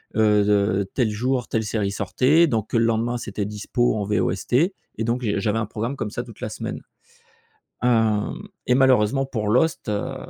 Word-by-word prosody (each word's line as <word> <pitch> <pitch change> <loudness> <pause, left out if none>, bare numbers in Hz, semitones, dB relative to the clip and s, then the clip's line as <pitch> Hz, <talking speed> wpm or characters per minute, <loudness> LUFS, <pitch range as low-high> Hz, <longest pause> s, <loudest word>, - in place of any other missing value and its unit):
heu, 105 -1 +4
de 100 -1 +1
tel 120 -5 +1
jour 125 +4 -1
telle 110 - -1
série 105 -1 -1
sortait 130 - +3
donc 110 -8 -2
le 115 - +4
lendemain 115 +1 0
c'était 105 -3 -4
dispo 105 +3 -1
en 105 - -1
VOST 100 0 -1
et 155 +9 +4 0.3
donc 120 +2 -1
j'ai 105 -3 0
j'avais 105 +1 0
un 115 - 0
programme 115 +5 -4
comme 110 -6 -4
ça 120 - -4
toute 115 -3 -14
la - - -3
semaine. 110 - -5 1.0
Hem, 115 - +1 0.2
et 125 - +3
malheureusement 130 0 +3
pour 110 -5 -3
Lost, 130 +7 +1
heu, 115 +6 -2
110 Hz, 180 wpm, -23 LUFS, 105-125 Hz, 1.0 s, heu